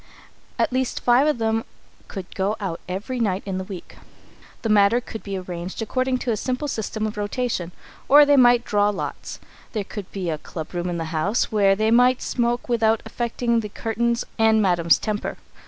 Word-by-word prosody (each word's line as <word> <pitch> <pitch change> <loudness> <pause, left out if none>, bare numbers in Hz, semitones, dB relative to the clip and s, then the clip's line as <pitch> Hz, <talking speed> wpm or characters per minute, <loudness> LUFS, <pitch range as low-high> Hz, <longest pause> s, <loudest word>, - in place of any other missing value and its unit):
At - - +1
least 260 -1 -1
five 250 +4 +4
of 300 - +2
them 225 0 0 0.4
could 190 -2 -8
go 200 +2 0
out 190 -5 -4
every 210 +7 -3
night 200 -4 0
in 190 -2 -3
the - - -3
week. 185 -2 -9 0.7
The 225 - -1
matter 210 +2 +5
could 225 -2 -8
be 200 -1 -4
arranged 180 0 -6
according 255 +3 0
to 240 - +1
a 220 - 0
simple 255 +6 -2
system 220 -3 -3
of 215 0 -4
rotation, 205 -4 -2 0.4
or 290 +1 +8
they 285 0 +5
might 245 -2 +5
draw 205 0 +2
lots. 205 - -5 0.3
There 215 -3 -1
could 200 -1 -8
be 185 -4 -3
a 155 - -3
club 160 +2 -8
room 175 0 -2
in 175 - -2
the 165 - -3
house, 195 +9 0
where 200 -2 +4
they 215 +2 +1
might 250 +2 +4
smoke 240 0 -1
without 225 -2 +2
affecting 235 0 -1
the 210 -2 -4
curtains 235 +3 -1
and 220 0 +5
Madam's 175 -5 +3
temper. 215 -1 -3
220 Hz, 190 wpm, -23 LUFS, 195-240 Hz, 0.7 s, or